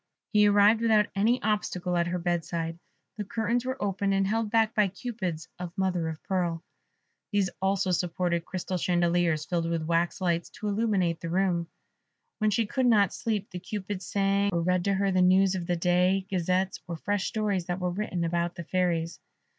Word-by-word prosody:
He 210 0 +6
arrived 205 +2 +5
without 220 -2 +3
any 225 +6 +2
obstacle 185 -4 -1
at 170 0 +1
her 180 +1 -1
bed 175 -1 -1
side; 165 0 -4 0.4
the 210 - -2
curtains 230 +4 -1
were 260 +1 -3
open, 200 0 0
and 195 0 +2
held 220 +2 0
back 225 0 +2
by 210 -2 +3
Cupids 190 -5 -5
of 180 +1 -7
mother 180 -3 0
of 160 -1 -6
pearl; 175 -3 -1 0.7
these 200 -2 +1
also 195 0 +1
supported 175 0 0
crystal 185 +1 -4
chandeliers 175 -3 +1
filled 170 -1 -1
with 165 -1 -1
wax 170 +1 0
lights, 170 -2 0
to 210 - -6
illumine 200 -5 +1
the 165 - -4
room. 175 -1 +1 0.7
When 215 -1 +2
she 220 +2 +1
could 260 +4 0
not 205 -5 +4
sleep 215 -4 -3
the 180 - -5
Cupids 195 0 -5
sang, 200 0 +1
or 170 -2 0
read 180 0 +1
to 200 -1 +2
her 195 0 +1
the 185 0 +2
news 185 +1 +4
of 180 -2 -4
the 175 - +1
day, 180 +2 +2
Gazettes, 185 +1 0
or 170 - -4
fresh 205 +3 -1
stories 205 -5 -1
that 175 +1 -2
were 180 -1 -1
written 180 -2 -2
about 170 +1 -1
the 170 - -6
Fairies. 170 -1 -1
185 Hz, 190 wpm, -28 LUFS, 175-205 Hz, 0.7 s, He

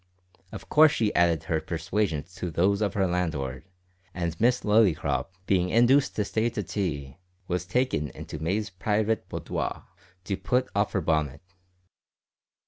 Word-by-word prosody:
Of - - -9
course 155 0 +6
she 110 -2 0
added 85 -3 +3
her 80 -1 -1
persuasions 85 -1 -2
to 90 - -3
those 95 +5 +1
of 100 -3 0
her 95 -2 +2
landlord, 75 -8 -2 0.5
and 85 -2 -2
Miss 125 +2 +3
Lillycrop, 105 -5 +2 0.2
being 90 -2 +2
induced 125 +6 +4
to 105 - 0
stay 110 +3 0
to 110 -3 -4
tea, 75 -8 -3 0.3
was 90 0 -2
taken 125 - 0
into 75 - -8
May's 100 +5 -1
private 105 +3 -1
boudoir - - -4 0.4
to 95 0 -2
put 125 +7 0
off 100 0 +1
her 95 - +1
bonnet. 75 -4 0
95 Hz, 145 wpm, -27 LUFS, 80-110 Hz, 0.5 s, course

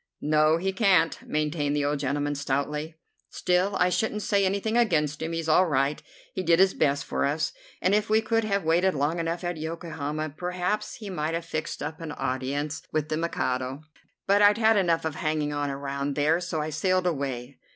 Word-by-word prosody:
"No, 155 +1 +3
he 190 +3 -1
can't," 190 -6 +3
maintained 150 -1 0
the 145 -1 +1
old 145 0 0
gentleman 145 +1 -1
stoutly. 145 +3 -2 0.3
"Still, 185 +2 +1
I 180 - +3
shouldn't 210 +3 -1
say 200 -2 +2
anything 200 +4 -1
against 155 -11 +2
him; 160 +1 -2
he's 165 -1 -3
all 180 +4 +5
right. 140 -1 +1 0.3
He - - -2
did 170 -2 +4
his 190 +1 +5
best 140 -2 +1
for - - -1
us, 145 +3 0 0.3
and 185 - +3
if 210 +1 +2
we 215 +1 +5
could 225 +1 +1
have 200 -2 0
waited 175 +3 +2
long 150 +4 0
enough 165 +2 -2
at 175 -1 -2
Yokohama 155 -2 -4
perhaps 180 +5 -2
he 210 -4 -8
might 160 -2 -2
have 165 0 -4
fixed 155 -1 -4
up 160 +1 -5
an 160 -2 -5
audience 140 +4 -2
with 155 0 -1
the 155 - 0
Mikado. 130 -4 -2 0.4
But 200 +1 +4
I'd 205 0 +6
had 225 0 +4
enough 170 -5 +2
of 160 - -1
hanging 155 -1 -1
on 145 -1 -1
around 140 0 -3
there, 150 +3 +3
and 180 - -5
so 170 -2 -3
I 155 +1 -3
sailed 185 +4 +1
away. 135 -5 -3
160 Hz, 200 wpm, -26 LUFS, 145-185 Hz, 0.4 s, I'd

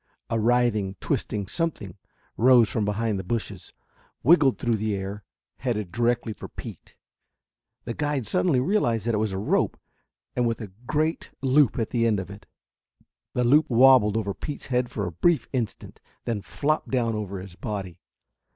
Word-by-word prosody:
A 115 - +1
writhing, 110 -4 +2
twisting 100 -2 -2
something 110 - -3 0.4
rose 120 -1 +6
from 105 0 -1
behind 105 0 -1
the - - -4
bushes, 115 +4 -4 0.5
wriggled 145 -1 +5
through 115 -2 0
the 110 0 -1
air, 100 +2 -5 0.3
headed 105 -8 -2
directly 120 -1 0
for - - -9
Pete. - - -10 0.9
The 115 - -4
guide 145 -2 -1
suddenly 170 - +2
realized 125 - +1
that 120 - +1
it 105 - +1
was 110 -1 0
a 95 - -3
rope, 100 - 0 0.6
with 120 -2 0
a 105 -5 -7 0.2
great 155 +2 0
loop 135 -2 +4
at 115 -3 -2
the 115 -1 +2
end 105 -3 +2
of 95 +1 -6
it. 100 0 -12 0.9
The 125 - +2
loop 145 +6 +4
wobbled 120 -3 +6
over 100 -3 -1
Pete's 145 +7 -6
head 125 -2 0
for 100 - -3
a 90 - -4
brief 145 - +2
instant, 120 -5 -4 0.2
then 115 -4 -2
flopped 150 +9 -1
down 120 -3 +1
over 100 -3 -4
his 95 -1 -9
body. 95 -5 -5
115 Hz, 165 wpm, -25 LUFS, 105-130 Hz, 0.9 s, rose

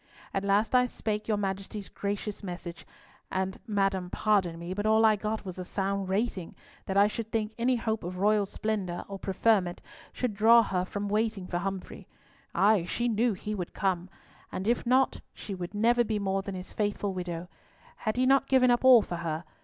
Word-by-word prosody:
At 195 - -1
last 200 +4 +2
I 250 0 +5
spake 215 -3 -3
your 215 -2 +1
Majesty's 195 0 -4
gracious 205 +1 -4
message; 175 -3 -7 0.4
and, 190 0 -2
madam, 195 -3 0
pardon 190 -5 +1
me, 170 +2 -5
but 205 +2 -2
all 220 +1 +5
I 215 -1 +6
got 215 +1 -3
was 185 -1 -6
a - - -3
sound 195 +1 -2
rating, 195 -3 -2 0.3
that 195 -1 -1
I 200 - +7
should 220 +1 -4
think 220 -1 -1
any 245 +2 +2
hope 220 -2 -2
of 180 +2 -5
royal 205 +1 +3
splendour 195 -5 -3
or 195 -1 -7
preferment 190 -2 +1 0.3
should 250 -4 -2
draw 230 +3 +6
her 185 -3 -1
from 205 +2 -4
waiting 215 -2 0
for 175 -1 -2
Humfrey. 195 0 -5 0.5
Ay, 205 -2 +4
she 240 +6 -1
knew 230 0 +2
he 210 +3 -5
would 180 -4 -5
come! 185 -2 -1 0.4
And 190 +2 -4
if 235 0 +1
not, 260 +2 +3
she 205 - -7
would 180 +1 -6
never 240 +3 +4
be 220 -2 -1
more 195 -1 0
than 195 0 -6
his 185 0 -8
faithful 205 -1 -1
widow. 175 -1 -4 0.5
Had 215 0 -2
he 255 - +3
not 275 +1 +4
given 255 -2 +5
up 240 - +2
all 255 -4 +8
for 175 - -5
her? 165 -1 -3
205 Hz, 195 wpm, -29 LUFS, 190-220 Hz, 0.5 s, all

